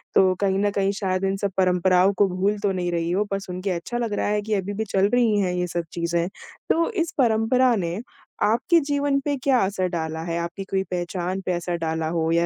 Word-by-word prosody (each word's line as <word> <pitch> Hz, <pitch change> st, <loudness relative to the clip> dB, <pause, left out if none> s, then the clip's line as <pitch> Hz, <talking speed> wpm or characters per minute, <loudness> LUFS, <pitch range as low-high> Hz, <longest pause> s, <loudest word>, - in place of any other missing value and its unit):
तो 185 Hz, -1 st, +5 dB
कहीं 195 Hz, -1 st, +2 dB
न 205 Hz, 0 st, +2 dB
कहीं 195 Hz, 0 st, +2 dB
शायद 185 Hz, -1 st, -1 dB
इन 195 Hz, 0 st, 0 dB
सब 200 Hz, 0 st, -2 dB
परंपराओं 185 Hz, +1 st, +3 dB
को 200 Hz, -, +4 dB
भूल 195 Hz, +3 st, 0 dB
तो 200 Hz, -1 st, 0 dB
नहीं 180 Hz, -2 st, -2 dB
रही 170 Hz, 0 st, -1 dB
हो 200 Hz, +4 st, +1 dB
पर 195 Hz, -, 0 dB
सुनके 185 Hz, 0 st, -4 dB
अच्छा 180 Hz, +7 st, -3 dB
लग 235 Hz, -3 st, -2 dB
रहा -, -, 0 dB
है 210 Hz, 0 st, +1 dB
कि 215 Hz, +1 st, -3 dB
अभी 200 Hz, 0 st, -1 dB
भी 220 Hz, +2 st, -2 dB
चल 195 Hz, +1 st, +2 dB
रही 230 Hz, -4 st, +3 dB
हैं 185 Hz, -3 st, 0 dB
ये 180 Hz, 0 st, -1 dB
सब 175 Hz, 0 st, -2 dB
चीज़ें। 170 Hz, 0 st, -1 dB, 0.4 s
तो 335 Hz, +1 st, +2 dB
इस 340 Hz, -6 st, -1 dB
परंपरा 240 Hz, 0 st, +3 dB
ने, 175 Hz, -2 st, -2 dB, 0.4 s
आपके 285 Hz, -, +3 dB
जीवन 285 Hz, -1 st, +1 dB
पे 290 Hz, -1 st, +1 dB
क्या 265 Hz, -3 st, +4 dB
असर 190 Hz, -1 st, -1 dB
डाला 160 Hz, -2 st, -3 dB
है? 170 Hz, 0 st, -2 dB
आपकी 170 Hz, +3 st, -4 dB
कोई 190 Hz, 0 st, -1 dB
पहचान 180 Hz, +1 st, -2 dB
पे 180 Hz, -, 0 dB
असर 175 Hz, 0 st, -2 dB
डाला 160 Hz, -1 st, -2 dB
हो 165 Hz, -1 st, 0 dB
या 170 Hz, +1 st, +3 dB
190 Hz, 230 wpm, -24 LUFS, 175-210 Hz, 0.4 s, तो